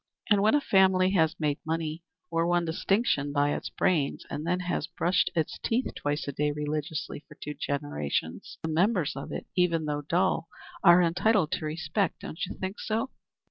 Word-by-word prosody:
And 205 Hz, -1 st, +5 dB
when 215 Hz, +6 st, +4 dB
a 295 Hz, -, +3 dB
family 190 Hz, -4 st, +4 dB
has 160 Hz, -4 st, +2 dB
made 150 Hz, -2 st, 0 dB
money 160 Hz, 0 st, -2 dB, 0.3 s
or 165 Hz, 0 st, +1 dB
won 175 Hz, 0 st, +2 dB
distinction 160 Hz, -, +1 dB
by 145 Hz, 0 st, +2 dB
its -, -, -4 dB
brains 150 Hz, -6 st, 0 dB
and 150 Hz, +3 st, -4 dB
then 180 Hz, +1 st, +1 dB
has 175 Hz, -3 st, -2 dB
brushed 175 Hz, +1 st, +1 dB
its 160 Hz, -2 st, -1 dB
teeth 240 Hz, +3 st, -1 dB
twice 145 Hz, 0 st, -2 dB
a -, -, -1 dB
day 150 Hz, +2 st, 0 dB
religiously 150 Hz, 0 st, -3 dB
for 150 Hz, -, -14 dB
two 150 Hz, -, -6 dB
generations, 75 Hz, -, -3 dB
the 160 Hz, -, -2 dB
members 175 Hz, 0 st, +1 dB
of 135 Hz, -, -6 dB
it, -, -, -5 dB
even 170 Hz, -3 st, +2 dB
though 145 Hz, -1 st, -2 dB
dull, 170 Hz, +2 st, +1 dB, 0.4 s
are 175 Hz, +1 st, +8 dB
entitled 185 Hz, +1 st, +2 dB
to -, -, -2 dB
respect, 160 Hz, +4 st, -1 dB
don't 155 Hz, -, -6 dB
you -, -, -7 dB
think 190 Hz, +3 st, -4 dB
so?" 225 Hz, +4 st, -1 dB
165 Hz, 180 wpm, -28 LUFS, 150-185 Hz, 0.4 s, are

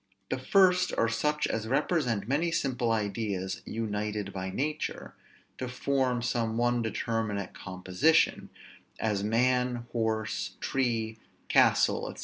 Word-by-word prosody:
The -, -, 0 dB
first 180 Hz, +5 st, +4 dB
are 115 Hz, -, +3 dB
such 150 Hz, +7 st, 0 dB
as 110 Hz, 0 st, -2 dB
represent 125 Hz, -, 0 dB
many 155 Hz, +6 st, +1 dB
simple 125 Hz, -6 st, 0 dB
ideas 100 Hz, -3 st, -2 dB
united 105 Hz, -2 st, -3 dB
by 95 Hz, 0 st, -4 dB
nature 150 Hz, +9 st, -3 dB, 0.5 s
to 130 Hz, -, -3 dB
form 125 Hz, -1 st, 0 dB
some 115 Hz, -2 st, -1 dB
one 120 Hz, 0 st, +2 dB
determinate 110 Hz, -3 st, -2 dB
composition, 95 Hz, -, +1 dB, 0.5 s
as 105 Hz, -3 st, 0 dB
man, 125 Hz, +2 st, +1 dB
horse, 110 Hz, -2 st, -2 dB
tree, 115 Hz, -4 st, -1 dB, 0.3 s
castle, -, -, +3 dB
&c. -, -, -12 dB
115 Hz, 120 wpm, -29 LUFS, 105-130 Hz, 0.5 s, first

